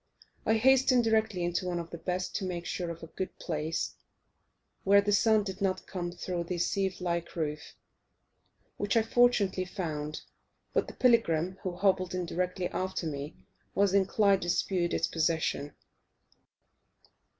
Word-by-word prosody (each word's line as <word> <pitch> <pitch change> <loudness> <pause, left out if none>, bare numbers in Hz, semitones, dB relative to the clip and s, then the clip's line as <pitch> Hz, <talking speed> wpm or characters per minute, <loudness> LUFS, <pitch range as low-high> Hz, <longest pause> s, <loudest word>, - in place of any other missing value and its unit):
I 220 - +4
hastened 255 +1 +5
directly 220 -5 +1
into 175 +1 -1
one 175 -1 -1
of 170 -1 -7
the 170 - -7
best 180 +1 -3
to 205 - -4
make 175 -2 -3
sure 175 -2 -3
of 170 0 -7
a 165 - -11
good 190 - -4
place, 160 -1 -3 0.9
where 200 +1 +6
the 205 +1 +1
sun 215 +1 +4
did 195 0 -6
not 190 -1 0
come 175 -2 -4
through 175 0 -4
the 180 +1 -3
sieve 190 +2 -1
like 170 -1 -2
roof, 150 -3 -4 1.0
which 205 +2 +1
I 225 - +4
fortunately 225 -5 +3
found 155 -5 -4 0.5
but - - +1
the - - -9
pilgrim, 190 -8 +2
who 185 -3 -3
hobbled 185 -1 +1
in 180 -1 -1
directly 180 +1 -2
after 185 -1 -3
me, 145 -1 -4 0.4
was 200 -1 +3
inclined 200 0 +3
to 175 - -4
dispute 175 0 +1
its - - +2
possession. 160 -3 -1
185 Hz, 155 wpm, -30 LUFS, 170-200 Hz, 1.0 s, where